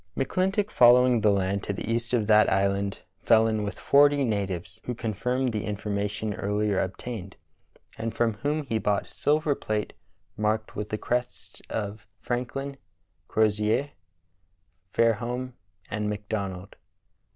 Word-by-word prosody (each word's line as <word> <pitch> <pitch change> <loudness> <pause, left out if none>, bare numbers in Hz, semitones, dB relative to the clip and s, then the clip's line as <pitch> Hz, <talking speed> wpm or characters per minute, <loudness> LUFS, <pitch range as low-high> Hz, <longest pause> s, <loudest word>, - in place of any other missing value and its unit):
McClintock 190 +8 0
following 125 -1 +6
the 105 - +4
land 100 0 +1
to 100 - -3
the 95 - -5
east 115 0 -1
of 120 -4 +2
that 110 0 +5
island 100 0 0 0.2
fell 110 -1 +5
in 110 -1 0
with 100 -1 -4
forty 145 0 +4
natives, 95 -5 -3
who 125 - -3
confirmed 125 +3 -1
the 105 -1 -2
information 105 0 -2
earlier 105 0 0
obtained, 95 +1 -5 0.6
and 115 0 -2
from 115 0 +1
whom 150 +6 -1
he 115 -5 -1
bought 105 -1 0
silver 150 0 +1
plate 110 -5 -3 0.4
marked 110 +1 -1
with 105 0 -4
the 110 - -2
crests 125 +3 -3
of 105 -2 -4
Franklin, 130 +3 -3 0.5
Crozier, 110 +5 +1 1.0
Fairholme, 120 +3 0 0.4
and 105 0 -1
McDonald. 100 -3 -4
110 Hz, 130 wpm, -27 LUFS, 105-125 Hz, 1.0 s, following